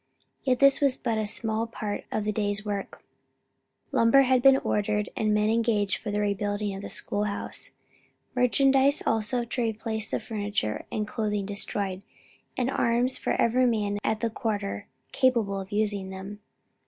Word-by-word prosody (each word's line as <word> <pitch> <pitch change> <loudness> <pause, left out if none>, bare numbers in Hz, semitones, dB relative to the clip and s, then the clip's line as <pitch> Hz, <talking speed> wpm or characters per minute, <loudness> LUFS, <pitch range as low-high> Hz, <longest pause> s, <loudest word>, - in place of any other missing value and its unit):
Yet 255 -2 +2
this 275 +3 +5
was 275 -3 +3
but 230 -3 -1
a 215 - -1
small 220 +1 -1
part 215 -2 -5
of 215 - -1
the 215 - +1
day's 205 0 -1
work: 200 -2 -5 0.9
lumber 230 +4 +5
had 255 -1 +3
been 270 +1 +7
ordered, 210 -3 -1
and 215 -1 +1
men 210 +1 +2
engaged 220 -4 +1
for 220 - -6
the 210 0 0
rebuilding 205 0 -1
of 195 - -6
the - - -7
school 205 +1 -2
house; 200 -1 -5 0.6
merchandise 270 +3 +4
also 225 +2 0
to 245 +1 -3
replace 220 -1 -2
the - - -1
furniture 205 - -3
and 210 -1 -2
clothing 210 -3 -2
destroyed; 200 -1 -2 0.6
and 255 +1 0
arms 245 +1 +1
for - - -1
every 250 +2 +3
man 205 -3 0
at 220 - 0
the 230 -1 0
quarter 205 -4 -3 0.2
capable 230 -7 +2
of 190 0 -8
using 205 -2 0
them. 190 +2 -8
215 Hz, 165 wpm, -27 LUFS, 205-235 Hz, 0.9 s, been